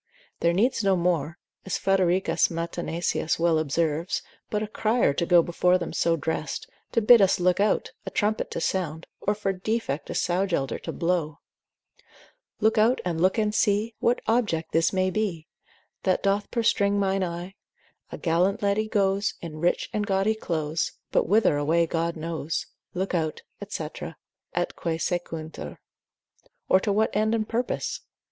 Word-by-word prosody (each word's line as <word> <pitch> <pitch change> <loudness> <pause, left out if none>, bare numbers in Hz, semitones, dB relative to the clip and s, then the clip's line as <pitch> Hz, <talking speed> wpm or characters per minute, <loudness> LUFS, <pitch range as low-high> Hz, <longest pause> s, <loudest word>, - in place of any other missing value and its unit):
There 170 - +3
needs 225 +6 +1
no 195 -1 +4
more, 170 -3 0 0.3
as 190 - -2
Fredericus 190 -1 +2
Matenesius 170 -1 -2
well 165 -1 +3
observes, 160 +2 -1 0.3
but 210 0 -1
a - - -3
crier 220 -6 +1
to 170 +4 -1
go 175 -2 +6
before 180 +2 +2
them 170 -2 -5
so 170 0 +2
dressed, 155 -1 -3 0.3
to 230 - +2
bid 235 +1 +8
us 190 -2 +4
look 180 +1 +2
out, 205 +1 +1
a - - -5
trumpet 215 +1 0
to - - -4
sound, 165 -2 -2 0.2
or 205 - +1
for 200 -2 -1
defect 190 -6 -2
a - - -4
sow 185 +3 +1
gelder 140 -7 -1
to - - -5
blow, 165 -4 -1 1.2
Look 220 0 +3
out, 230 +4 +4
look 180 +3 +1
out - - +3
and 210 0 -1
see 215 +1 +1
What 240 +1 +2
object 215 -9 0
this 165 0 +3
may 185 -1 +1
be 185 -6 -2 0.6
That 185 -1 +1
doth 200 +1 +1
perstringe 205 -3 +2
mine 195 -1 +1
eye; 175 +1 -5 0.6
A - - -5
gallant 180 +5 +1
lady 200 +2 +1
goes 200 -1 +1
In 155 -2 -7
rich 175 +2 +1
and 210 -1 -1
gaudy 195 +2 +2
clothes, 160 -6 -2 0.2
But - - +2
whither 205 -5 +4
away 160 +4 +2
God 165 +1 -1
knows, 160 -1 -3 0.3
———look 190 +2 -2
out, 160 -3 -1 0.3
&c., - - -3 0.7
et - - -1
quae 165 -1 -2
sequuntur, 160 - -4 0.9
or 185 - +5
to 205 - -1
what 215 +1 +1
end 215 +2 +2
and 215 -1 -1
purpose? 240 +2 -2
185 Hz, 165 wpm, -26 LUFS, 165-205 Hz, 1.2 s, bid